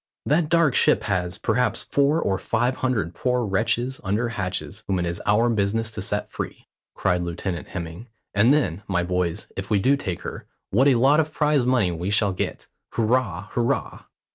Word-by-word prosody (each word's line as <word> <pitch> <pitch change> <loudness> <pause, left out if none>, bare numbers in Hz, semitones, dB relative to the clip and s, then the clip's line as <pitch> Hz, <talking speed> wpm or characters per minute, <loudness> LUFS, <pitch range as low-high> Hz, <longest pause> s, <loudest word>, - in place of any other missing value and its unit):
"That 150 +1 +2
dark 165 -5 +4
ship - - +4
has, 90 -3 -1
perhaps, 120 -3 0
four 145 +3 +2
or 95 - 0
five 120 +3 0
hundred 110 -10 -1
poor 125 +5 0
wretches 120 +6 0
under 105 +5 0
hatches 100 0 -4
whom 95 - 0
it 90 - 0
is 85 0 -3
our 110 +3 +4
business 110 0 0
to 105 - -5
set 105 +1 -1
free," - - -6 0.3
cried 90 -1 +1
Lieutenant 85 +1 -4
Hemming. 85 +6 -7 0.3
"And 105 +5 +4
then, 100 - +1
my 90 -3 0
boys, 90 0 -1
if 95 0 -5
we 105 - +3
do 130 +8 +3
take 95 -11 -4
her, - - -7 0.2
what 130 +8 +4
a 135 - +5
lot 135 +6 +4
of 155 -1 0
prize 150 -5 +2
money 120 -8 +3
we 85 +3 -3
shall 100 -1 +2
get? - - -4 0.3
Hurrah! 125 +3 0
hurrah!" 120 -1 -1
110 Hz, 185 wpm, -24 LUFS, 95-125 Hz, 0.3 s, a